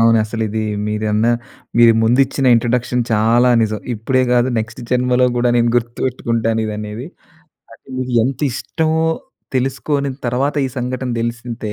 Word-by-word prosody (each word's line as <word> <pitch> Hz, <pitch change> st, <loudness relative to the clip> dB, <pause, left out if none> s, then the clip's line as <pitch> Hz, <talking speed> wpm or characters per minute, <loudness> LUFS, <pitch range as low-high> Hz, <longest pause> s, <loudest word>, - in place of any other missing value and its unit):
అవునసలిది 110 Hz, -1 st, +1 dB, 0.2 s
మీరన్న 105 Hz, +1 st, 0 dB, 0.5 s
మీరు 120 Hz, -1 st, +7 dB
ముందిచ్చిన 130 Hz, +3 st, +2 dB
ఇంట్రోడక్షన్ 120 Hz, +1 st, +1 dB
చాలా 115 Hz, +3 st, +3 dB
నిజం. 110 Hz, -1 st, -1 dB, 0.2 s
ఇప్పుడే 130 Hz, +4 st, 0 dB
గాదు 125 Hz, +1 st, +3 dB
నెక్స్ట్ 110 Hz, +2 st, -5 dB
జన్మలో 125 Hz, 0 st, +3 dB
గూడా 120 Hz, 0 st, +2 dB
నేను 120 Hz, 0 st, +3 dB
గుర్తుపెట్టుకుంటాను 115 Hz, -1 st, -1 dB
ఇదనేది. 105 Hz, +4 st, -5 dB, 0.7 s
అది -, -, -19 dB
మీకు 130 Hz, -1 st, -3 dB
ఎంతిష్టమో 150 Hz, +4 st, -1 dB, 0.5 s
తెలుసుకొని 140 Hz, +2 st, -1 dB, 0.2 s
తర్వాత 130 Hz, +4 st, 0 dB
ఈ -, -, -4 dB
సంఘటన 125 Hz, +1 st, -3 dB
తెలిసితే 115 Hz, -2 st, -4 dB
120 Hz, 120 wpm, -18 LUFS, 115-130 Hz, 0.7 s, మీరు